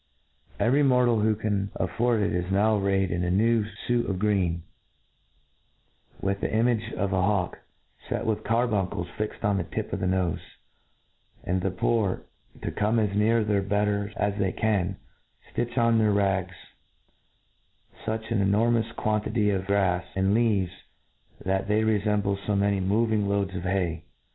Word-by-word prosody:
Every 135 Hz, +5 st, +3 dB
mortal 125 Hz, -4 st, +4 dB
who 110 Hz, 0 st, +2 dB
can 100 Hz, -2 st, -1 dB
afford 120 Hz, -2 st, 0 dB
it 100 Hz, -, 0 dB
is 90 Hz, +1 st, -2 dB
now 105 Hz, +3 st, +3 dB
arrayed 95 Hz, -2 st, +1 dB
in 90 Hz, 0 st, -1 dB
a 90 Hz, -, 0 dB
new 110 Hz, +4 st, +3 dB, 0.2 s
fuit' 120 Hz, -2 st, +1 dB
of 95 Hz, -, -1 dB
greeny, 90 Hz, -5 st, 0 dB, 1.6 s
with 100 Hz, 0 st, -2 dB
the -, -, -1 dB
image 115 Hz, 0 st, +1 dB
of 95 Hz, +1 st, -1 dB
a 95 Hz, -, +2 dB
hawk 95 Hz, -2 st, 0 dB, 0.5 s
fet -, -, -2 dB
with 110 Hz, -2 st, -1 dB
carbuncles 105 Hz, -6 st, 0 dB
fixed 110 Hz, 0 st, -4 dB
on 100 Hz, -1 st, +2 dB
the 95 Hz, -, 0 dB
tip -, -, -5 dB
of -, -, -1 dB
the 95 Hz, -, -1 dB
nofe; 90 Hz, -2 st, 0 dB, 1.0 s
and 90 Hz, +1 st, -1 dB
the 95 Hz, -, 0 dB
poor, 100 Hz, +1 st, 0 dB, 0.4 s
to -, -, -2 dB
come 110 Hz, +2 st, +1 dB
as 105 Hz, -3 st, +1 dB
near 110 Hz, +2 st, +3 dB
their 105 Hz, -1 st, +1 dB
betters 100 Hz, +1 st, 0 dB
as 105 Hz, 0 st, +1 dB
they 95 Hz, -2 st, +1 dB
can, 100 Hz, -4 st, 0 dB, 0.6 s
ftitch 120 Hz, +1 st, -2 dB
on 115 Hz, -1 st, +4 dB
their 110 Hz, -1 st, +3 dB
rags 95 Hz, -3 st, 0 dB, 1.5 s
fuch 110 Hz, +1 st, -4 dB
an 110 Hz, -3 st, +2 dB
enormous 115 Hz, +3 st, +2 dB
quantity 105 Hz, -1 st, 0 dB
of 95 Hz, -1 st, -2 dB
gra& 95 Hz, -3 st, +2 dB
and 95 Hz, +2 st, +2 dB
leaves^ 105 Hz, -6 st, +2 dB, 0.7 s
that 95 Hz, +1 st, 0 dB
they 105 Hz, +1 st, +2 dB
refemble 105 Hz, -2 st, +1 dB
fo 105 Hz, -, 0 dB
many 100 Hz, 0 st, +2 dB
moving 105 Hz, +1 st, +1 dB
loads 100 Hz, -1 st, 0 dB
of 90 Hz, -, -4 dB
hay. 90 Hz, -3 st, -1 dB
100 Hz, 160 wpm, -26 LUFS, 95-110 Hz, 1.6 s, mortal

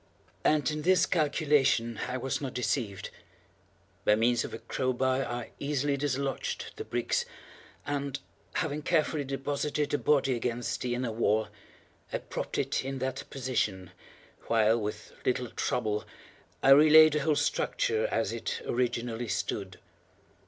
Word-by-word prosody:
And 150 Hz, -2 st, +3 dB
in 150 Hz, 0 st, -3 dB
this 185 Hz, +2 st, +4 dB
calculation 145 Hz, -7 st, +2 dB
I 125 Hz, -, -2 dB
was 135 Hz, +3 st, -2 dB
not 135 Hz, -3 st, -4 dB
deceived. 110 Hz, -4 st, -2 dB, 0.9 s
By 105 Hz, -, +5 dB
means 120 Hz, +2 st, +2 dB
of -, -, -6 dB
a -, -, -5 dB
crow 130 Hz, +2 st, -2 dB
bar 130 Hz, +1 st, +1 dB
I 120 Hz, -1 st, -5 dB
easily 145 Hz, 0 st, 0 dB
dislodged 140 Hz, -1 st, -2 dB
the -, -, -4 dB
bricks, 120 Hz, 0 st, 0 dB, 0.6 s
and, 140 Hz, -1 st, -2 dB, 0.3 s
having 155 Hz, -4 st, -1 dB
carefully 155 Hz, -2 st, +1 dB
deposited 140 Hz, +2 st, -2 dB
the 145 Hz, -, +1 dB
body 135 Hz, -3 st, +2 dB
against 120 Hz, 0 st, -2 dB
the 120 Hz, -1 st, -1 dB
inner 125 Hz, -1 st, -2 dB
wall, 110 Hz, -1 st, +1 dB, 0.6 s
I -, -, 0 dB
propped -, -, -5 dB
it -, -, 0 dB
in 135 Hz, +1 st, -4 dB
that 130 Hz, +1 st, -3 dB
position, 110 Hz, -9 st, -2 dB, 0.6 s
while, 115 Hz, 0 st, +3 dB
with 105 Hz, 0 st, -5 dB
little 125 Hz, -1 st, 0 dB
trouble, 105 Hz, -4 st, -1 dB, 0.6 s
I 135 Hz, -, +6 dB
re 150 Hz, +3 st, +8 dB
laid 155 Hz, 0 st, +9 dB
the 150 Hz, -, +2 dB
whole 150 Hz, +1 st, +2 dB
structure 445 Hz, -, 0 dB
as -, -, -1 dB
it 475 Hz, -1 st, -4 dB
originally 120 Hz, -1 st, -1 dB
stood. 95 Hz, -3 st, -3 dB
130 Hz, 145 wpm, -29 LUFS, 120-145 Hz, 0.9 s, laid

